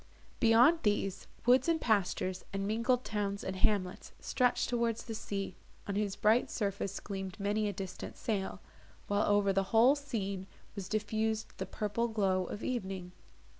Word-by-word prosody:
Beyond 240 Hz, +8 st, +6 dB
these, 195 Hz, -2 st, 0 dB, 0.2 s
woods 250 Hz, +6 st, +5 dB
and 330 Hz, -1 st, +3 dB
pastures, 185 Hz, -, 0 dB
and 195 Hz, 0 st, -2 dB
mingled 235 Hz, +4 st, +1 dB
towns 200 Hz, -2 st, -2 dB
and 190 Hz, -, -3 dB
hamlets 185 Hz, -1 st, 0 dB
stretched 250 Hz, -1 st, +1 dB
towards 235 Hz, -2 st, 0 dB
the 230 Hz, -, -6 dB
sea, 200 Hz, -2 st, -4 dB, 0.3 s
on 200 Hz, -, -3 dB
whose 200 Hz, -1 st, 0 dB
bright 220 Hz, +3 st, +3 dB
surface 200 Hz, -2 st, -2 dB
gleamed 195 Hz, -1 st, -6 dB
many 210 Hz, +1 st, +1 dB
a -, -, 0 dB
distant 190 Hz, -1 st, -6 dB
sail; 195 Hz, -3 st, -2 dB, 0.4 s
while, 205 Hz, 0 st, +1 dB
over 205 Hz, -1 st, +3 dB
the 195 Hz, 0 st, +2 dB
whole 235 Hz, +4 st, +6 dB
scene, 200 Hz, -9 st, -4 dB, 0.3 s
was 195 Hz, -2 st, -6 dB
diffused 220 Hz, +1 st, -1 dB
the 190 Hz, -, -3 dB
purple 210 Hz, +4 st, -1 dB
glow 195 Hz, -4 st, +1 dB
of 205 Hz, -, -6 dB
evening. 190 Hz, -7 st, -3 dB
205 Hz, 155 wpm, -32 LUFS, 195-225 Hz, 0.4 s, Beyond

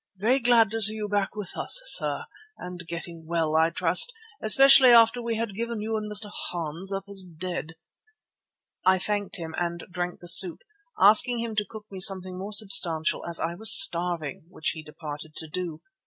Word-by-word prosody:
"Very 235 Hz, +8 st, 0 dB
glad 235 Hz, -4 st, +2 dB
to 225 Hz, 0 st, -4 dB
see 215 Hz, +1 st, +7 dB
you 210 Hz, -1 st, -5 dB
back 205 Hz, 0 st, -3 dB
with 210 Hz, -4 st, -8 dB
us, -, -, +2 dB
sir, -, -, +2 dB, 0.3 s
and 180 Hz, 0 st, -10 dB
getting 170 Hz, -1 st, -8 dB
well, 165 Hz, -2 st, -2 dB
I 160 Hz, +1 st, +2 dB
trust, 170 Hz, -, +3 dB, 0.3 s
especially 270 Hz, +3 st, +6 dB
after 235 Hz, 0 st, +4 dB
we 230 Hz, -1 st, -4 dB
had 225 Hz, -2 st, -5 dB
given 230 Hz, +2 st, -5 dB
you 220 Hz, +1 st, -4 dB
and 210 Hz, -1 st, -6 dB
Mr. 210 Hz, 0 st, -1 dB, 0.2 s
Hans 170 Hz, +2 st, -6 dB
up 195 Hz, 0 st, -5 dB
as 200 Hz, -1 st, -3 dB
dead." 170 Hz, -2 st, -8 dB, 1.1 s
I 185 Hz, +1 st, +3 dB
thanked 205 Hz, +2 st, -3 dB
him 165 Hz, -3 st, -7 dB
and 170 Hz, 0 st, -5 dB
drank 175 Hz, 0 st, -6 dB
the 175 Hz, -, -14 dB
soup, 175 Hz, 0 st, +4 dB, 0.4 s
asking 215 Hz, +5 st, +4 dB
him 230 Hz, -2 st, -6 dB
to 210 Hz, -1 st, -2 dB
cook 220 Hz, -2 st, -12 dB
me 190 Hz, -, -9 dB
something 185 Hz, -1 st, -1 dB
more 195 Hz, +3 st, -8 dB
substantial 185 Hz, -6 st, +1 dB
as 170 Hz, -1 st, +1 dB
I 165 Hz, +1 st, -4 dB
was 220 Hz, +5 st, +3 dB
starving, 170 Hz, -, 0 dB
which 160 Hz, -3 st, -4 dB
he 160 Hz, -, -7 dB
departed 155 Hz, 0 st, -11 dB
to 160 Hz, -, -8 dB
do. 165 Hz, -1 st, -7 dB
190 Hz, 185 wpm, -24 LUFS, 170-215 Hz, 1.1 s, see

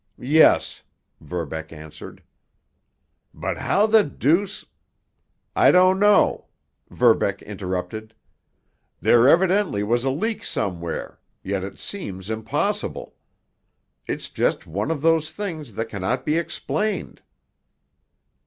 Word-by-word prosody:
"Yes," 150 Hz, +6 st, +3 dB, 0.4 s
Verbeck 80 Hz, 0 st, -5 dB
answered. 80 Hz, -1 st, -11 dB, 1.1 s
"But, -, -, -4 dB
how 205 Hz, -, +2 dB
the 220 Hz, -1 st, +5 dB
deuce——" 175 Hz, +7 st, 0 dB, 0.9 s
"I -, -, +6 dB
don't 185 Hz, +1 st, +5 dB
know," 205 Hz, 0 st, +4 dB, 0.4 s
Verbeck -, -, +2 dB
interrupted. 95 Hz, +5 st, -5 dB, 0.8 s
"There 120 Hz, +2 st, +5 dB
evidently 180 Hz, -, +3 dB
was 120 Hz, +3 st, 0 dB
a 135 Hz, -, +1 dB
leak 220 Hz, -, -2 dB
somewhere, 85 Hz, -3 st, -4 dB, 0.2 s
yet 95 Hz, 0 st, -2 dB
it 100 Hz, 0 st, -7 dB
seems 100 Hz, -, -6 dB
impossible. 110 Hz, 0 st, -2 dB, 0.9 s
It's -, -, -4 dB
just -, -, 0 dB
one 100 Hz, -, -3 dB
of 155 Hz, -3 st, -2 dB
those 160 Hz, -1 st, +2 dB
things 155 Hz, -, -6 dB
that 115 Hz, 0 st, -3 dB
cannot 110 Hz, +5 st, -2 dB
be 150 Hz, -, +1 dB
explained." 210 Hz, +5 st, -3 dB
130 Hz, 105 wpm, -23 LUFS, -, 1.1 s, I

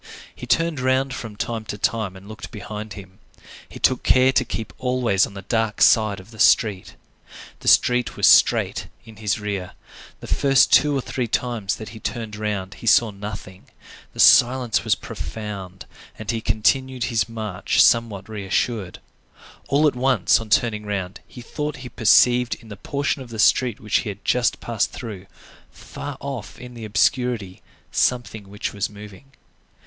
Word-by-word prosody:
He -, -, -9 dB
turned 165 Hz, -3 st, +1 dB
round 130 Hz, +1 st, +1 dB
from 115 Hz, -4 st, -7 dB
time 115 Hz, +1 st, -4 dB
to 105 Hz, -, -6 dB
time 105 Hz, -2 st, -1 dB
and 95 Hz, +1 st, -13 dB
looked 110 Hz, +1 st, -9 dB
behind 105 Hz, -1 st, -7 dB
him. 95 Hz, 0 st, -12 dB, 0.5 s
He -, -, -10 dB
took 130 Hz, -, +2 dB
care 130 Hz, +1 st, +4 dB
to 130 Hz, -, +2 dB
keep 115 Hz, -2 st, -6 dB
always 125 Hz, -6 st, +1 dB
on 100 Hz, -, -14 dB
the 100 Hz, -, -8 dB
dark 115 Hz, +1 st, -1 dB
side 110 Hz, -3 st, +4 dB
of 95 Hz, +5 st, -15 dB
the 110 Hz, -, -14 dB
street. 105 Hz, -4 st, +3 dB, 0.6 s
The -, -, -10 dB
street 125 Hz, 0 st, +3 dB
was -, -, +2 dB
straight -, -, +4 dB, 0.2 s
in 110 Hz, -2 st, -14 dB
his 105 Hz, 0 st, -1 dB
rear. 100 Hz, -3 st, -4 dB, 0.5 s
The -, -, -10 dB
first 135 Hz, -2 st, +3 dB
two 145 Hz, -2 st, +5 dB
or -, -, -1 dB
three 125 Hz, -1 st, -3 dB
times 115 Hz, -4 st, -2 dB
that 110 Hz, -, -9 dB
he 110 Hz, -, -11 dB
turned 110 Hz, -2 st, -5 dB
round 105 Hz, -3 st, -3 dB
he 115 Hz, -, -7 dB
saw 115 Hz, -1 st, +5 dB
nothing; 100 Hz, -2 st, -9 dB, 0.5 s
the -, -, -14 dB
silence 125 Hz, -1 st, +5 dB
was -, -, +2 dB
profound, 100 Hz, -4 st, -7 dB, 0.3 s
and 110 Hz, 0 st, -3 dB
he 115 Hz, -1 st, -3 dB
continued 130 Hz, +4 st, 0 dB
his 115 Hz, -1 st, 0 dB
march 110 Hz, -5 st, -2 dB
somewhat 110 Hz, -4 st, +2 dB
reassured. 105 Hz, -1 st, -2 dB, 0.7 s
All 145 Hz, +3 st, +3 dB
at 145 Hz, -, 0 dB
once, 125 Hz, -5 st, +3 dB
on 115 Hz, -1 st, -8 dB
turning 105 Hz, 0 st, +1 dB
round, 100 Hz, -3 st, -4 dB
he 125 Hz, -, -11 dB
thought 150 Hz, +3 st, -4 dB
he -, -, -7 dB
perceived 120 Hz, +2 st, +4 dB
in 115 Hz, -, -17 dB
the 105 Hz, -, -7 dB
portion 140 Hz, +7 st, -2 dB
of 125 Hz, -, -10 dB
the 115 Hz, -, -8 dB
street 120 Hz, +1 st, +3 dB
which 105 Hz, -1 st, 0 dB
he 115 Hz, -, -3 dB
had 100 Hz, 0 st, -9 dB
just 125 Hz, -2 st, +1 dB
passed 110 Hz, -3 st, -1 dB
through, 100 Hz, -6 st, -8 dB, 0.4 s
far 145 Hz, -2 st, -8 dB
off 135 Hz, -6 st, -7 dB
in 125 Hz, 0 st, -10 dB
the 115 Hz, -2 st, -8 dB
obscurity, 110 Hz, -2 st, 0 dB, 0.3 s
something 110 Hz, -5 st, -1 dB
which 105 Hz, +3 st, -5 dB
was 100 Hz, +1 st, -2 dB
moving. 105 Hz, +6 st, -13 dB
110 Hz, 175 wpm, -22 LUFS, 105-125 Hz, 0.7 s, two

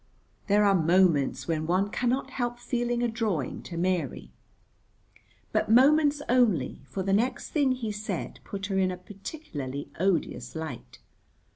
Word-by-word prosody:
There 210 Hz, +1 st, +4 dB
are 200 Hz, -, +5 dB
moments 170 Hz, -4 st, +3 dB
when 155 Hz, -2 st, -1 dB
one 190 Hz, +4 st, +1 dB
cannot 250 Hz, +3 st, 0 dB
help 240 Hz, -2 st, -2 dB
feeling 240 Hz, 0 st, -1 dB
a -, -, +3 dB
drawing 220 Hz, -, -2 dB
to 170 Hz, -, -8 dB
Mary. 175 Hz, -5 st, -1 dB, 1.2 s
But -, -, 0 dB
moments 290 Hz, +4 st, +5 dB
only, 220 Hz, -, +2 dB
for 190 Hz, +7 st, -4 dB
the 195 Hz, +1 st, 0 dB
next 245 Hz, +5 st, 0 dB
thing 280 Hz, -4 st, +2 dB
he 235 Hz, -4 st, -3 dB
said 210 Hz, +1 st, -4 dB
put 200 Hz, -1 st, -5 dB
her 195 Hz, -1 st, 0 dB
in 185 Hz, -1 st, +3 dB
a 180 Hz, -, -4 dB
particularly 180 Hz, -, -7 dB
odious 185 Hz, -2 st, 0 dB
light. 125 Hz, -6 st, -6 dB
195 Hz, 145 wpm, -28 LUFS, 170-240 Hz, 1.2 s, are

